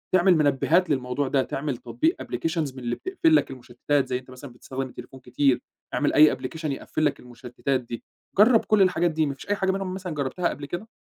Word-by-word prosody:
تعمل 185 0 +5
مِنبهات 155 +4 +2
للموضوع 130 0 -1
ده، 135 0 +2
تعمل 135 -1 -3
تطبيق 315 - -1
applications 160 -4 -2
من - - -8
اللي 120 0 -1
بتقفل 355 -4 +2
لك - - +2
المشتتات، 130 +2 -1
زَي 125 - -1
أنت 130 0 -16
مثلًا 130 +1 -10
بتستخدم 130 +2 -6
التليفون 130 +1 -11
كتير، 130 +1 +1 0.3
اعمل - - +1
أي 155 0 +6
application 155 +5 -7
يقفل 155 +3 -2
لك 145 - 0
المشتتات 125 +2 -3
دي. 120 -1 -8 0.3
جرب 225 +3 +6
كُلّ 215 -2 +3
الحاجات 175 -2 +3
دي، 155 0 +1
ما 140 - -2
فيش 135 - -13
أي 205 - +2
حاجة 190 -1 +1
منهم 190 -1 -3
مثلًا 185 -3 -5
جربتها 150 +5 -1
قبل 145 - -6
كده؟ 175 +9 -6
145 Hz, 205 wpm, -25 LUFS, 130-180 Hz, 0.3 s, أي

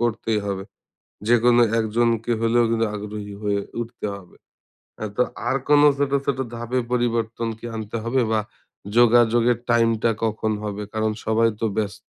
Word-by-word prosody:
করতেই 115 -2 0
হবে। 95 -1 -3 0.6
যেকোনো 120 +1 +5 0.2
একজনকে 115 +1 0
হলেও 115 +1 +3
কিন্তু 115 0 +1
আগ্রহী 105 0 -6
হয়ে 100 -1 0 0.2
উঠতে 120 0 -7
হবে। 95 -3 -14 0.6
হ্যাঁ 110 -1 -5
তো 125 - +5 0.3
আর 130 - +2
কোনো 145 0 +6
ছোট, 140 -1 0
ছোট 140 - 0 0.2
ধাপে 120 +2 -2
পরিবর্তন 115 -2 0
কি - - -9
আনতে 110 +1 -4
হবে 130 +3 +1
বা 110 - +2 0.6
যোগাযোগের 120 0 +5
টাইমটা 115 -1 +3 0.2
কখন 110 0 -1
হবে? 105 0 -4
কারণ 110 0 0
সবাই 115 +1 +3
তো - - +1
ব্যস্ত 105 -2 -3
115 Hz, 150 wpm, -23 LUFS, 110-120 Hz, 0.6 s, কোনো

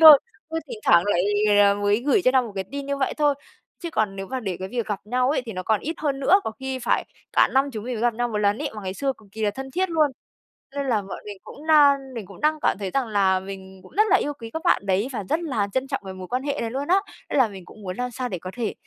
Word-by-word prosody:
thôi. 310 -3 +12 0.3
Ừ, 325 0 -2
thỉnh 475 -3 -6
thoảng 170 0 +7
lại 180 -3 +2 0.5
mới 205 0 +2
gửi 365 +6 +4
cho 255 - +5
nhau 260 -1 +4
một 225 -4 -7
cái 190 -1 -2
tin 280 0 -4
như 280 0 -1
vậy 270 - 0
thôi, 295 -2 +3 0.5
chứ 340 - -3
còn 215 -5 0
nếu 195 0 -5
mà 260 +3 -3
để 190 -6 -3
cái 190 - -5
việc 235 +1 -2
gặp 205 -2 -3
nhau 250 +4 +1
ấy 295 - 0
thì 225 - -5
nó 185 0 -4
còn 215 +2 +1
ít 320 +4 -3
hơn 280 -3 -1
nữa, 380 +9 +5
có - - -1
khi 265 -1 -3
phải 240 - +1 0.3
cả - - +5
năm 275 +1 +3
chúng 215 0 -5
mình 250 0 -3
mới 225 - -4
gặp 240 -1 +2
nhau 240 +1 0
1 215 - -3
lần 205 +1 +2
ấy, - - -2
mà 210 - -7
ngày 190 0 -4
xưa 275 +2 0
cực 210 -2 -19
kỳ 220 +1 -5
là 205 - +3
thân 265 +5 -7
thiết 370 +4 0
luôn. 310 -3 +3 0.7
Nên 280 -1 -1
là 220 -4 +2
bọn 195 - -7
mình 205 -2 -7
cũng 305 +2 -11
đang 280 -4 +5
mình 225 -4 -5
cũng 195 +8 -13
đang 305 0 +2
cảm - - +2
thấy 195 -2 -4
rằng 270 -3 +1
là 195 -3 +3
mình 190 0 -9
cũng - - -15
rất 425 - +6
là - - +6
yêu 290 - -2
quý 230 -1 -7
các 320 - -3
bạn 200 - +3
đấy, 195 +4 +1
và 210 - -3
rất 320 - +2
là 225 -11 -1
trân 260 +1 0
trọng - - -2
cái 190 - -6
mối 185 -1 -8
quan 250 +2 -2
hệ 285 0 -2
này 230 - -2
luôn 275 +3 -3
á. 375 +3 +5 0.3
Nên - - -1
là 245 - +5
mình 190 -3 -10
cũng 215 - -14
muốn 185 -2 -5
làm 250 0 -2
sao 250 +1 -3
để 180 -5 -4
có 185 - -7
thể 235 -4 -2
240 Hz, 310 wpm, -24 LUFS, 200-280 Hz, 0.7 s, thôi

